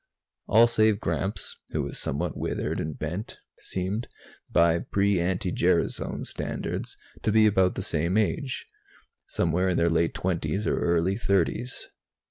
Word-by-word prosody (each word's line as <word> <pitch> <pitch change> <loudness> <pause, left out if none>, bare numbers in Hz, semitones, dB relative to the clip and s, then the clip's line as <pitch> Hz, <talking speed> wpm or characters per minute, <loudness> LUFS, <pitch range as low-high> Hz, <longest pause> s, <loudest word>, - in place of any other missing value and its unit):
All 115 +3 +7
save 110 -3 +3
Gramps, 100 -1 -3
who - - -1
was - - -3
somewhat - - -2
withered - - -2
and 75 -3 -4
bent, 85 +8 -4 0.2
seemed, 95 +6 -3 0.4
by 85 0 +4
pre 100 +1 +1
anti 90 +1 0
gerasone - - 0
standards, - - -4 0.2
to 110 - +1
be 110 0 +5
about 95 -3 +3
the 95 - -2
same 85 +1 0
age 130 +5 -1 0.6
somewhere 90 +3 +1
in 90 - +1
their 85 0 +3
late 80 0 +1
twenties 90 +2 -1
or - - +1
early 85 +3 +1
thirties. 100 +3 0
95 Hz, 140 wpm, -27 LUFS, 85-105 Hz, 0.6 s, All